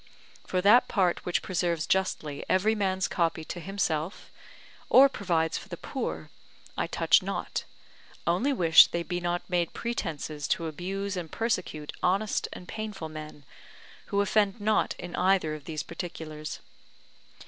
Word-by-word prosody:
For 185 - 0
that 210 +6 +6
part 185 -5 +1
which 175 - 0
preserves 170 -3 0
justly 155 -6 -1
every 205 +4 +3
man's 190 -3 0
copy 165 -2 0
to 175 - -6
himself, 175 -2 -2 0.6
or 270 +2 +8
provides 170 -9 0
for - - -13
the - - -6
poor, - - -5 0.4
I - - -1
touch - - +4
not, - - -3 0.6
only 185 +12 +2
wish 165 -11 +7
they 170 - -2
be 175 +1 -3
not 175 0 -2
made 175 -2 0
pretences 160 -10 -3
to 165 - 0
abuse 190 +5 -3
and 170 -4 -5
persecute 185 -9 -2
honest 200 +4 +1
and 180 - -9
painful 210 -7 -5
men, 155 -2 -9 0.6
who 200 - +1
offend 205 +1 +2
not 215 +1 +1
in 175 0 -6
either 185 -4 +2
of 150 -2 -8
these 155 -2 -4
particulars. 160 -3 -6
180 Hz, 145 wpm, -28 LUFS, 160-200 Hz, 0.6 s, or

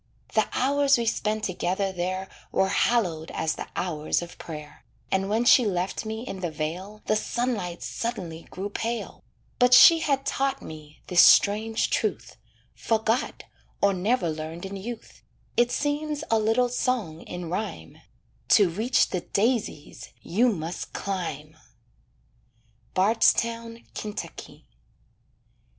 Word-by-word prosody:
The - - +3
hours 280 +1 +3
we 235 - -1
spent 215 -1 -1
together 190 +1 -1
there 185 +1 -3 0.2
Were 190 - +2
hallowed 180 -8 +1
as 160 - 0
the - - -7
hours 160 -2 -1
of 175 - -11
prayer, 150 -2 -9 0.3
And 190 +1 +1
when 225 +3 +1
she 250 - +7
left 190 +1 -2
me 220 +1 -4
in 190 - -5
the 175 -2 -2
vale 175 +7 -5
The 215 - +2
sunlight 215 -6 -2
suddenly 180 -9 -5
grew 200 +2 -5
pale; 230 +2 -4 0.4
But 250 0 +7
she 330 +6 +9
had 275 -4 0
taught 275 0 0
me 155 -1 -11
this 175 -1 +5
strange 220 +2 +4
truth, - - -2 0.4
Forgot, 225 +2 -1 0.4
or 200 0 +3
never 190 -1 0
learned 160 +3 -6
in 195 +1 -6
youth, 225 +4 -8 0.3
It 240 0 +3
seems 295 +1 -1
a 225 - +4
little 225 +3 +2
song 235 -10 -1
in 175 -1 -7
rhyme, 180 - -5 0.6
"To 195 -5 +4
reach 220 +9 +2
the 180 - -1
daisies, 215 - -2
you 230 +8 +2
must 170 -3 -5
climb." 155 -6 -4 1.4
BARDSTOWN, 230 +3 +2
KY. 210 0 -7
205 Hz, 130 wpm, -26 LUFS, 175-235 Hz, 1.4 s, she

